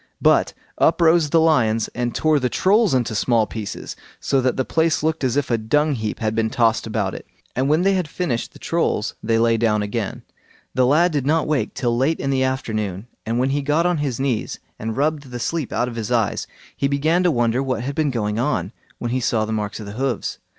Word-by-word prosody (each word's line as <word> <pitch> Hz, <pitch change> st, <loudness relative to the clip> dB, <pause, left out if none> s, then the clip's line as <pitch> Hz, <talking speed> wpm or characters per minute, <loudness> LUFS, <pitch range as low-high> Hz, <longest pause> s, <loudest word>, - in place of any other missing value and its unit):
But -, -, +3 dB, 0.2 s
up -, -, +3 dB
rose 165 Hz, -2 st, +4 dB
the 165 Hz, -, +4 dB
lions 115 Hz, -9 st, +3 dB
and 120 Hz, 0 st, -2 dB
tore 155 Hz, -2 st, +3 dB
the 125 Hz, -2 st, 0 dB
Trolls 200 Hz, -, +3 dB
into 120 Hz, -3 st, 0 dB
small 115 Hz, +1 st, +2 dB
pieces, 105 Hz, 0 st, -6 dB, 0.2 s
so 135 Hz, -, +1 dB
that 130 Hz, 0 st, 0 dB
the 130 Hz, -, 0 dB
place 160 Hz, -1 st, +1 dB
looked 160 Hz, -1 st, 0 dB
as 130 Hz, +1 st, +1 dB
if 140 Hz, -3 st, 0 dB
a 115 Hz, -, +2 dB
dung 150 Hz, +7 st, +1 dB
heap 110 Hz, -4 st, -3 dB
had 110 Hz, -1 st, -1 dB
been 110 Hz, 0 st, 0 dB
tossed 115 Hz, -1 st, +1 dB
about 105 Hz, -4 st, -1 dB
it; -, -, -9 dB, 0.3 s
and 130 Hz, +3 st, +1 dB
when 155 Hz, +4 st, +3 dB
they 195 Hz, +1 st, +3 dB
had 185 Hz, -4 st, 0 dB
finished 150 Hz, -8 st, -2 dB
the -, -, -13 dB
Trolls 165 Hz, -10 st, -1 dB
they 115 Hz, 0 st, +1 dB
lay 115 Hz, 0 st, +3 dB
down 105 Hz, -2 st, +1 dB
again. 105 Hz, 0 st, -4 dB, 0.5 s
The 130 Hz, -1 st, +3 dB
lad 170 Hz, +6 st, +4 dB
did 140 Hz, -3 st, -1 dB
not 160 Hz, +1 st, +2 dB
wake 150 Hz, -3 st, -1 dB
till 120 Hz, -2 st, 0 dB
late 135 Hz, +7 st, +1 dB
in 135 Hz, -, -1 dB
the 130 Hz, -1 st, +1 dB
afternoon, 110 Hz, -7 st, -2 dB, 0.2 s
and 115 Hz, +1 st, 0 dB
when 130 Hz, +2 st, +1 dB
he 145 Hz, +1 st, 0 dB
got 150 Hz, +4 st, +1 dB
on 175 Hz, -3 st, +1 dB
his 135 Hz, -5 st, -2 dB
knees 130 Hz, -5 st, -2 dB, 0.2 s
and 110 Hz, 0 st, -4 dB
rubbed 145 Hz, -1 st, 0 dB
the 125 Hz, -, -5 dB
sleep 160 Hz, +2 st, -2 dB
out 120 Hz, -, 0 dB
of 120 Hz, -1 st, -6 dB
his 115 Hz, +1 st, -4 dB
eyes, 115 Hz, -5 st, 0 dB, 0.3 s
he 140 Hz, -, 0 dB
began 155 Hz, +5 st, +1 dB
to 180 Hz, -, +3 dB
wonder 120 Hz, -3 st, +1 dB
what 130 Hz, -3 st, -2 dB
had 140 Hz, +2 st, -3 dB
been 155 Hz, 0 st, +1 dB
going 105 Hz, -4 st, -1 dB
on, 115 Hz, -, -1 dB, 0.3 s
when 120 Hz, -, -3 dB
he 130 Hz, -, 0 dB
saw 110 Hz, -2 st, +1 dB
the 110 Hz, -, -3 dB
marks 105 Hz, -1 st, -3 dB
of 105 Hz, -, -8 dB
hoofs. 120 Hz, +3 st, -3 dB
130 Hz, 230 wpm, -21 LUFS, 115-150 Hz, 0.5 s, rose